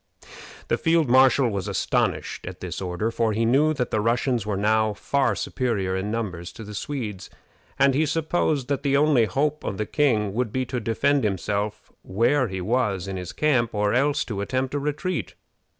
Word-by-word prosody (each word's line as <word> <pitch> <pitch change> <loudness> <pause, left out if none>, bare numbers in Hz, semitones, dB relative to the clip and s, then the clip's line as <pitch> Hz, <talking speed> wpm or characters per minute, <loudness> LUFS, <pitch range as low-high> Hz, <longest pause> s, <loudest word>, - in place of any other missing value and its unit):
The - - 0
field 165 -4 +2
marshal 130 0 +5
was 100 -1 -3
astonished 100 - -1
at - - -7
this - - -5
order, 95 +5 -2
for 115 -1 0
he 115 +2 +1
knew 140 +7 +4
that 125 -3 -2
the 110 - +1
Russians 120 +1 0
were 105 -2 -1
now 110 +1 +2
far 140 +6 0
superior 100 -8 -1
in 95 +2 -2
numbers 95 -6 -4
to 115 - -9
the 105 0 -9
Swedes, 105 -4 -5 0.5
and 135 0 +4
he 155 +3 +2
supposed 155 -3 0
that 140 -2 -1
the 140 -1 +2
only 145 -5 +4
hope 150 +6 -1
of 95 - -3
the 110 - -1
king 110 -10 +1
would 120 -1 -1
be 130 +2 -1
to 125 +1 -3
defend 130 +5 +1
himself 105 +1 -2
where 120 +7 +1
he 95 -1 -5
was 105 -3 0
in 95 - -4
his 90 -1 -5
camp, 125 -8 +1
or 105 0 +1
else 140 +3 +2
to 100 -4 -4
attempt 130 +5 -2
a 145 - 0
retreat. 150 +5 -3
115 Hz, 190 wpm, -24 LUFS, 105-140 Hz, 0.5 s, marshal